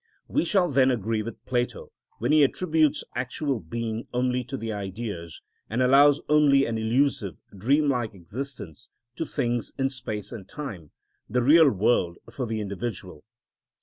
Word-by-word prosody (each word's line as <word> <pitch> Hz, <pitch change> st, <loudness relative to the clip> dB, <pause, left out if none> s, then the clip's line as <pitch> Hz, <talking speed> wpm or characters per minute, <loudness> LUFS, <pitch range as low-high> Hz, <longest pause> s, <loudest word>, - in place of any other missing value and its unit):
We -, -, 0 dB
shall 180 Hz, 0 st, +3 dB
then 130 Hz, -1 st, +4 dB
agree 115 Hz, -2 st, 0 dB
with 115 Hz, +1 st, -8 dB
Plato 120 Hz, -1 st, -2 dB, 0.3 s
when -, -, 0 dB
he 155 Hz, -1 st, +6 dB
attributes 155 Hz, 0 st, +2 dB
actual 130 Hz, +2 st, -2 dB
being 110 Hz, +6 st, -4 dB
only 125 Hz, 0 st, 0 dB
to 135 Hz, +3 st, -5 dB
the 115 Hz, -2 st, -4 dB
Ideas, 100 Hz, -4 st, -6 dB, 0.3 s
and 115 Hz, -, -2 dB
allows 135 Hz, +3 st, +5 dB
only 145 Hz, -2 st, +5 dB
an 115 Hz, -1 st, -2 dB
illusive, 110 Hz, -, +1 dB, 0.2 s
dream 140 Hz, +10 st, +2 dB
like 120 Hz, -6 st, -1 dB
existence 115 Hz, -, -7 dB, 0.3 s
to 165 Hz, -, -3 dB
things 120 Hz, -4 st, -2 dB
in 135 Hz, -1 st, 0 dB
space 105 Hz, -6 st, -5 dB
and 100 Hz, -6 st, -9 dB
time, 100 Hz, -, -7 dB, 0.4 s
the 125 Hz, +2 st, +1 dB
real 155 Hz, +3 st, +7 dB
world 95 Hz, -5 st, +1 dB
for 125 Hz, -3 st, -4 dB
the 110 Hz, 0 st, -2 dB
individual. 100 Hz, -5 st, -5 dB
120 Hz, 150 wpm, -26 LUFS, 105-140 Hz, 0.4 s, real